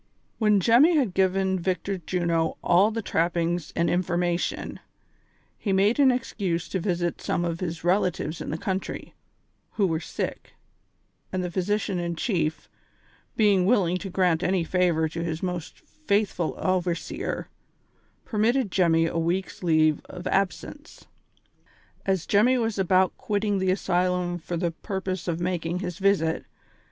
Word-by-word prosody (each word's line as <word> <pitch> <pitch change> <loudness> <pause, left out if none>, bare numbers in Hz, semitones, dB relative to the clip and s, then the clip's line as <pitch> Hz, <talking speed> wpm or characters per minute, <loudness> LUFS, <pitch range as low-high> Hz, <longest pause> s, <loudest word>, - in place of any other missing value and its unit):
"When 210 -2 +4
Jemmy 255 - +5
had 245 -11 +1
given 190 0 +1
Victor 185 +2 -2
Juno 170 -2 -1
all 190 +5 +5
the 225 0 -4
trappings 170 -1 0
and 170 - +2
information, 175 0 -1 0.8
he 200 - -1
made 200 +7 +3
an 275 -2 +6
excuse 200 -9 -1
to 190 - -1
visit 175 -2 -1
some 175 - -1
of 170 -1 -2
his 170 -3 -4
relatives 175 -3 0
in - - -5
the 155 - -2
country, 190 +2 -4 0.6
who 205 - +2
were 165 -3 0
sick, - - -5 0.8
and 185 -1 -1
the 180 - -3
physi 200 +4 0
cian 195 -4 -3
in 170 -1 -2
chief, 160 -4 -1 0.7
being 200 -4 +3
willing 185 -6 +3
to 195 +1 -6
grant 180 -3 +2
any 185 -1 +1
favor 170 -2 +1
to 165 +2 -5
his 165 0 -3
most 180 -3 -4
faithful 205 - -1
overseer, 180 -2 -2 0.8
permitted 225 0 +1
Jemmy 165 -3 +3
a 165 0 -1
week's 175 +3 -2
leave 155 -3 +3
of 180 0 -9
ab 195 -1 +2
sence. 290 - -12 1.0
As 190 -3 +1
Jemmy 240 +6 +4
was 225 -4 -1
about 185 0 +3
quitting 205 -4 -1
the 190 0 +1
asylum 180 -1 0
for 175 +1 -4
the 170 0 0
pur 190 +3 -5
pose 185 -2 -4
of 170 -1 -1
making 175 -1 -1
his 180 -1 -5
visit. 190 -5 +1
180 Hz, 150 wpm, -26 LUFS, 170-200 Hz, 1.0 s, an